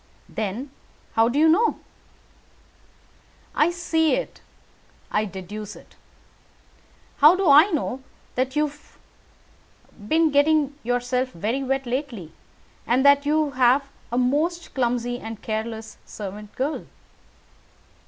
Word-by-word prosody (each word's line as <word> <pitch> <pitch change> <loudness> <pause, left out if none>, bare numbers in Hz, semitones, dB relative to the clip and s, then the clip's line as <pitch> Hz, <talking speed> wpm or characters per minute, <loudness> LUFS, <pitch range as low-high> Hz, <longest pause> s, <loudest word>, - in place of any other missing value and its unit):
"Then 220 +6 -4 0.4
how 225 +1 +4
do 255 - -2
you 315 +2 +5
know?" 390 +9 +3 1.8
"I 305 - +3
see 330 -2 +1
it, - - -5 0.7
I 210 +1 +1
deduce 200 +2 -7
it. - - -17 1.2
How 300 +5 +7
do 380 -1 0
I 300 +7 +8
know 280 -6 -2 0.3
that 260 +2 -1
you 300 0 +2
have 295 +1 -20 1.1
been 320 +2 +3
getting 290 0 +3
yourself 245 +2 -1
very 220 +10 -2
wet 270 0 -1
lately, 240 - -4 0.6
and 255 +3 +2
that 280 0 +5
you 305 -1 +2
have 260 +2 +3 0.2
a 240 - -1
most 305 +8 0
clumsy 245 -1 -1
and 225 -1 -7
careless 220 0 -5
servant 205 0 -8
girl?" 280 +4 -3
265 Hz, 115 wpm, -24 LUFS, 230-300 Hz, 1.8 s, I